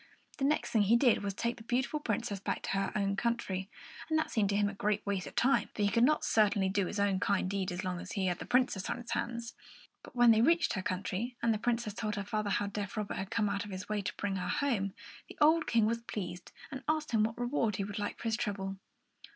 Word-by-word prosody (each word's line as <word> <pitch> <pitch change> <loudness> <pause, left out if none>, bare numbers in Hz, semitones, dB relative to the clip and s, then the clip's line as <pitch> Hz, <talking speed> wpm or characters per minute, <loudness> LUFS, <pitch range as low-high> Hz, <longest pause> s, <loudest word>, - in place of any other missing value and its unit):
The 270 - +1
next 300 +2 +1
thing 220 - +4
he 205 +3 +4
did 240 -1 +4
was 200 -1 -3
to - - -6
take 235 +1 0
the 225 - -11
beautiful 260 +6 0
Princess 210 -5 -2
back - - -3
to - - -4
her 195 0 0
own 200 -1 +1
country; 200 -4 -1 0.4
and 315 - +2
that 315 - 0
seemed 205 -3 +2
to 200 - +1
him 205 0 +3
a 200 - -3
great 210 +1 -1
waste 195 -5 -1
of - - -10
time, 270 +3 +3
for 210 - 0
he 205 - +4
could 230 +4 +3
not 305 +4 +3
certainly 205 -3 +3
do 195 -1 +1
his 205 - -4 0.2
kind 200 -4 +1
deed 195 -1 -1
so 175 - -3
long 180 -1 -2
as - - -7
he 195 -3 0
had 180 -2 0
the - - -7
Princess 250 -7 +1
on - - -1
his 240 0 -8
hands. 235 0 -3 0.5
But - - -14
when 240 -1 +7
they 220 0 +5
reached 335 +7 +3
her 190 - -2
country 195 +6 -3
and 230 -1 +4
the 215 - -2
Princess 235 -2 0
told 215 -1 -2
her 200 - -2
father 215 0 -2
how 205 - +1
deaf 200 0 -4
Robert 210 -1 -2
had 190 - -4
come 225 -1 +1
out 200 0 -1
of 205 - -9
his 190 +1 -6
way 210 -1 0
to 195 - -4
bring 195 -1 -1
her 180 -1 -3
home, 210 -9 0 0.3
the - - -11
old 315 +2 +5
King 230 -2 +3
was 230 +1 0
pleased, 180 -6 -6 0.2
and 265 -1 -5
asked 310 -2 0
him 220 -2 +3
what 225 +1 -1
reward 240 -4 0
he 200 - -1
would 205 +1 -5
like 205 - -3
for - - -11
his 225 -1 0
trouble. 195 -4 -3
210 Hz, 265 wpm, -32 LUFS, 195-235 Hz, 0.5 s, when